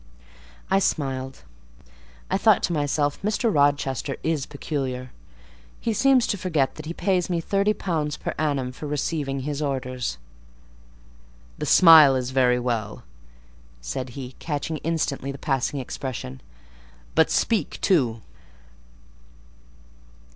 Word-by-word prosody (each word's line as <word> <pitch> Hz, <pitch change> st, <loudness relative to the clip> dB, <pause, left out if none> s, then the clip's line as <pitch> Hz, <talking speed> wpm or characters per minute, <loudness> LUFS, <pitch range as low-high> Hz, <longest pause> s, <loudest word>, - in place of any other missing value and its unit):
I 195 Hz, -, +5 dB
smiled: 135 Hz, -7 st, -2 dB, 0.9 s
I -, -, +2 dB
thought -, -, +4 dB
to -, -, 0 dB
myself 145 Hz, -1 st, 0 dB
Mr. 215 Hz, +2 st, 0 dB
Rochester 140 Hz, -2 st, +1 dB
is 155 Hz, -4 st, -1 dB
peculiar—he 125 Hz, -, -6 dB
seems 265 Hz, +2 st, +4 dB
to 200 Hz, -, -2 dB
forget 160 Hz, -8 st, 0 dB
that 155 Hz, 0 st, -9 dB
he -, -, -3 dB
pays 185 Hz, -1 st, 0 dB
me 175 Hz, -2 st, 0 dB
£30 180 Hz, -5 st, -1 dB
per -, -, -3 dB
annum 140 Hz, -5 st, 0 dB
for 150 Hz, +4 st, -8 dB
receiving 145 Hz, -2 st, -2 dB
his 145 Hz, +2 st, -3 dB
orders. 130 Hz, -3 st, -3 dB, 1.4 s
"The -, -, -3 dB
smile 160 Hz, -6 st, +8 dB
is 130 Hz, 0 st, -2 dB
very 125 Hz, -2 st, +3 dB
well," 115 Hz, -4 st, -3 dB, 0.8 s
said -, -, -5 dB
he, 130 Hz, -2 st, -6 dB
catching 155 Hz, 0 st, -3 dB
instantly 150 Hz, -4 st, -2 dB
the 140 Hz, -, -8 dB
passing 135 Hz, 0 st, -1 dB
expression; 125 Hz, -, -6 dB, 0.7 s
"but -, -, +4 dB
speak 210 Hz, -10 st, 0 dB
too." 125 Hz, -, +2 dB
145 Hz, 115 wpm, -24 LUFS, 130-165 Hz, 1.4 s, smile